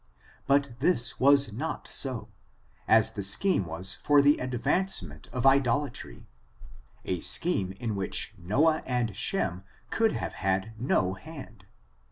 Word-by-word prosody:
But 140 -1 +2
this 130 -5 +1
was 140 -4 +5
not 155 +9 -5
so^ 130 -4 0 0.6
as 110 -1 +4
the 100 - -6
scheme 100 - +2
was 90 +4 +3
for 145 +7 +2
the 145 +1 +5
advancement 125 - -2
of 125 - -4
idolatry^ 135 - 0 0.8
a 90 - -2
scheme 95 - -1
in 110 +2 -5
which 100 +2 -3
Noah 135 - +1
and 125 -3 -1
Sheni 95 - -2 0.3
could 225 -1 +1
have - - -5
had 95 +2 -1
no 100 -6 0
hand. 115 -4 -12
120 Hz, 130 wpm, -27 LUFS, 95-140 Hz, 0.8 s, was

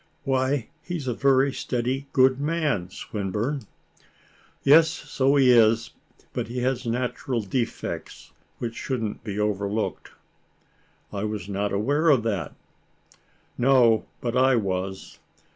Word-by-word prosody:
"Why, 130 -2 0
he 175 0 -4
is 140 -5 -7
a 125 - 0
very 135 +1 +3
steady, 130 +3 -2
good 130 0 +4
man, 150 - 0
Swinburne." 105 +7 -3 1.0
"Yes, 160 +3 +7
so 140 -1 0
he 135 -3 +6
is; 115 -1 +4 0.4
but - - -3
he 125 +2 -4
has 125 -1 -1
natural 120 0 -2
defects, 115 +4 -4 0.3
which 115 -1 -4
shouldn't 115 -6 -3
be 105 -2 -5
overlooked." 105 +1 -2 1.0
"I 100 0 -3
was 105 -3 -4
not 100 0 -2
aware 145 +11 +2
of 130 -7 +4
that." 100 -9 -2 1.0
"No, 120 -3 +4
but 120 0 -2
I 130 +1 +4
was. 95 -3 -3
120 Hz, 125 wpm, -25 LUFS, 105-135 Hz, 1.0 s, Yes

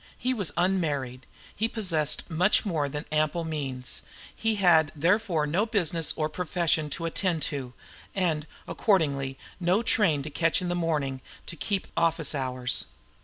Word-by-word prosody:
He 255 +1 0
was 200 - -1
unmarried; 145 -9 0 0.3
he 220 - +1
possessed 180 -10 +1
much 180 +7 +3
more 155 -7 0
than 150 +3 -5
ample 155 +2 +1
means; 135 -7 -3 0.3
he 225 -1 +1
had 165 -6 +4
therefore 170 0 +2
no 180 +9 +1
business 175 -7 +1
or 155 -1 0
profession 165 -2 0
to 165 +3 -3
attend 165 -2 0
to, 135 -4 -3 0.4
and 165 -5 0 0.2
accordingly 140 -9 +1 0.2
no 185 +5 +2
train 165 -11 +2
to 155 - -7
catch 165 +3 +2
of 180 -1 -2
a - - +1
morning 155 -6 0
in 130 - -9
order - - -29 0.2
to - - -4
keep 195 +4 -2
office 165 -2 +2
hours. 130 -3 +1
165 Hz, 160 wpm, -27 LUFS, 145-185 Hz, 0.4 s, had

